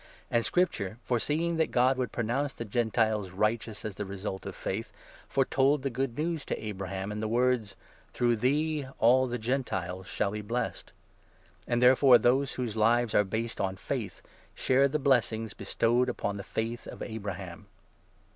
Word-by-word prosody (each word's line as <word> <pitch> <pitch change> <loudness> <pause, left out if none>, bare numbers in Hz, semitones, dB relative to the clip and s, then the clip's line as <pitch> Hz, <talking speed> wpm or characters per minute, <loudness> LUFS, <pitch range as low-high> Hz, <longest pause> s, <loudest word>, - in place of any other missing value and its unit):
And 120 0 +2
Scripture, 175 - +1
8 - - -2
Ground 105 +5 -12
of - - -36
foreseeing 155 +7 0
that 160 - +2
God 130 +2 +3
would 125 - -1
pronounce 125 +5 -1
the 115 - -5
Gentiles 110 -2 +1
Acceptance. 95 +3 -3 0.2
rjghteous 110 -1 -8
ag 110 - -2
the 105 - -5
result 95 0 -5
Qf - - -6
fajth> 110 +4 -4 0.4
foretold 135 +1 +2
the 135 - -1
Good 125 0 -2
News 160 -1 -1
to - - -3
Abraham 95 -1 -4
in 105 - -4
the 110 - -1
words 120 -3 +1
— - - -26
' - - -32
Through 120 -1 +1
thee 145 +4 0
all 130 +3 +5
the 120 0 -2
Gentiles 95 -7 -2
shall 100 - -1
be 105 0 -4
blessed.' 115 +3 -3 0.8
And, 120 0 +1
therefore, 130 0 +7
those 130 +3 +2
whose 120 -4 -3
lives 115 +1 +3
are 105 - +5
based 110 +4 -3
on 95 -1 -1
faith - - -5 0.3
share 135 +2 +3
the 145 +3 -1
9 145 - -10
blessings 115 -5 +2
bestowed 120 +5 +1
upon 100 -4 -2
the 100 - -6
faith 115 +4 -4
of - - -7
Abraham. 100 -6 -6
115 Hz, 185 wpm, -29 LUFS, 105-130 Hz, 0.8 s, therefore